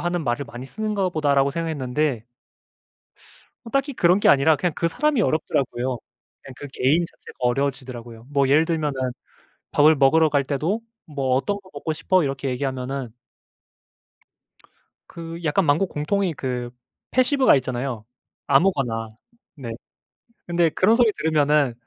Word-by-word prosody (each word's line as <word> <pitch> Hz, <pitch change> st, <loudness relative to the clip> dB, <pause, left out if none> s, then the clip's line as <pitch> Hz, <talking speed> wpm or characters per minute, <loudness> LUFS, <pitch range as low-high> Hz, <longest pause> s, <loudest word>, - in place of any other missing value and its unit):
하는 175 Hz, -2 st, -2 dB
말을 120 Hz, +4 st, -1 dB
많이 125 Hz, +2 st, -9 dB
쓰는가 210 Hz, 0 st, -2 dB
보다.'라고 140 Hz, -4 st, +2 dB
생각했는데 145 Hz, -5 st, -2 dB, 1.4 s
어 -, -, -8 dB
딱히 275 Hz, +2 st, 0 dB
그런 180 Hz, -1 st, +3 dB
게 -, -, +4 dB
아니라 140 Hz, +3 st, +5 dB
그냥 165 Hz, +3 st, -1 dB
그 170 Hz, -, 0 dB
사람이 295 Hz, -, +1 dB
어렵더라고요. 130 Hz, -6 st, -1 dB, 0.5 s
그냥 135 Hz, -, -11 dB
그 145 Hz, -, -8 dB
개인 145 Hz, +8 st, +2 dB
자체가 -, -, -14 dB
어려워지더라고요. 125 Hz, -3 st, -3 dB
뭐 140 Hz, -1 st, +2 dB
예를 150 Hz, +4 st, +4 dB
들면은 155 Hz, -4 st, -1 dB, 0.8 s
밥을 155 Hz, +2 st, +5 dB
먹으러 155 Hz, +3 st, +4 dB
갈 140 Hz, -1 st, +2 dB
때도 155 Hz, -, -1 dB, 0.2 s
"뭐 135 Hz, -4 st, -1 dB
어떤 200 Hz, +10 st, 0 dB
거 185 Hz, -, -19 dB
먹고 145 Hz, +2 st, -4 dB
싶어?" 175 Hz, +2 st, +2 dB
이렇게 135 Hz, -1 st, -2 dB
얘기하면은 130 Hz, -1 st, -3 dB, 2.0 s
그 165 Hz, 0 st, -8 dB
약간 165 Hz, +4 st, +1 dB
만국 160 Hz, +6 st, +2 dB
공통의 180 Hz, +4 st, -1 dB
그 125 Hz, -3 st, -4 dB, 0.4 s
패시브가 255 Hz, -, +4 dB
있잖아요. 125 Hz, -3 st, -4 dB, 0.4 s
"아무거나." 135 Hz, -8 st, +2 dB, 0.5 s
네. 125 Hz, -5 st, -7 dB, 0.8 s
근데 170 Hz, -1 st, +2 dB
그런 210 Hz, +8 st, +3 dB
소리 235 Hz, -3 st, +4 dB
들으면은 150 Hz, -, +2 dB
145 Hz, 320 characters per minute, -23 LUFS, 130-170 Hz, 2.0 s, 아니라